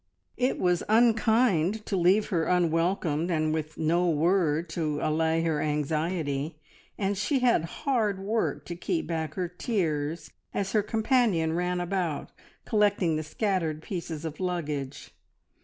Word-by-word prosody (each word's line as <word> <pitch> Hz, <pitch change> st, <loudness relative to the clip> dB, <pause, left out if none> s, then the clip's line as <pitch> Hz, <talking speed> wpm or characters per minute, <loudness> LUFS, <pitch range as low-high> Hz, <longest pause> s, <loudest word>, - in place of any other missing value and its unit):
It 255 Hz, +1 st, +1 dB
was 180 Hz, -1 st, +2 dB
unkind 220 Hz, -4 st, +3 dB
to 200 Hz, -, -2 dB
leave 190 Hz, +4 st, +3 dB
her 170 Hz, -5 st, +1 dB
unwelcomed 170 Hz, -1 st, +1 dB
and 155 Hz, -2 st, +1 dB
with 155 Hz, -1 st, -4 dB
no 170 Hz, +3 st, +2 dB
word 165 Hz, 0 st, +2 dB
to 155 Hz, -3 st, -2 dB
allay 160 Hz, +2 st, +1 dB
her 160 Hz, -3 st, 0 dB
anxiety, 150 Hz, 0 st, -1 dB, 0.4 s
and 200 Hz, 0 st, 0 dB
she 230 Hz, +7 st, 0 dB
had 235 Hz, -10 st, +3 dB, 0.2 s
hard 225 Hz, -8 st, +1 dB
work 210 Hz, +4 st, -1 dB
to 175 Hz, -, -5 dB
keep 325 Hz, -, -2 dB
back 160 Hz, -2 st, -3 dB
her 180 Hz, -2 st, -1 dB
tears 165 Hz, -5 st, -2 dB, 0.2 s
as 195 Hz, -1 st, -1 dB
her 215 Hz, -, +3 dB
companion 215 Hz, -6 st, +1 dB
ran 180 Hz, +1 st, -1 dB
about 175 Hz, -3 st, -2 dB, 0.3 s
collecting 205 Hz, -6 st, +2 dB
the 155 Hz, -, -1 dB
scattered 160 Hz, -2 st, -1 dB
pieces 165 Hz, -4 st, -5 dB
of 155 Hz, -1 st, -6 dB
luggage. 150 Hz, -7 st, -3 dB
175 Hz, 140 wpm, -27 LUFS, 155-200 Hz, 0.4 s, unkind